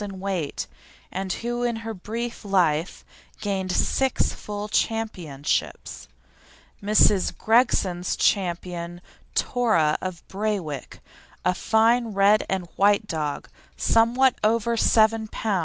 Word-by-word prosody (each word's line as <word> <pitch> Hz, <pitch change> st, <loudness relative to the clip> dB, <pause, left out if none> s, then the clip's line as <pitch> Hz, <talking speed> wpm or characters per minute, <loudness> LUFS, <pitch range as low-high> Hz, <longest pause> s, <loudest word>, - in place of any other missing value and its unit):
in 195 Hz, -2 st, -6 dB
weight, 185 Hz, -6 st, -3 dB, 0.5 s
and 190 Hz, 0 st, -3 dB
who 240 Hz, +1 st, -3 dB
in 240 Hz, -1 st, 0 dB
her 225 Hz, 0 st, -5 dB
brief 230 Hz, +5 st, -5 dB
life 180 Hz, -5 st, 0 dB, 0.3 s
gained 190 Hz, -2 st, -2 dB
six 265 Hz, +7 st, +1 dB
full 205 Hz, 0 st, -6 dB
championships. 175 Hz, -, -2 dB, 0.7 s
Mrs. 205 Hz, -1 st, +3 dB
Gregson's 205 Hz, -6 st, +2 dB
Ch. -, -, +4 dB, 1.0 s
Tora 215 Hz, -12 st, +2 dB
of 185 Hz, -3 st, -6 dB
Braywick, 190 Hz, -9 st, -4 dB, 0.5 s
a 180 Hz, -, +3 dB
fine 230 Hz, +4 st, +2 dB
red 200 Hz, +2 st, +4 dB
and 190 Hz, -2 st, -1 dB
white 205 Hz, +2 st, +4 dB
dog, 155 Hz, -6 st, -3 dB, 0.3 s
somewhat 240 Hz, +3 st, +3 dB
over 230 Hz, +2 st, +2 dB
7 220 Hz, 0 st, +3 dB
lb. 210 Hz, -2 st, -1 dB
205 Hz, 105 wpm, -24 LUFS, 185-225 Hz, 1.0 s, Ch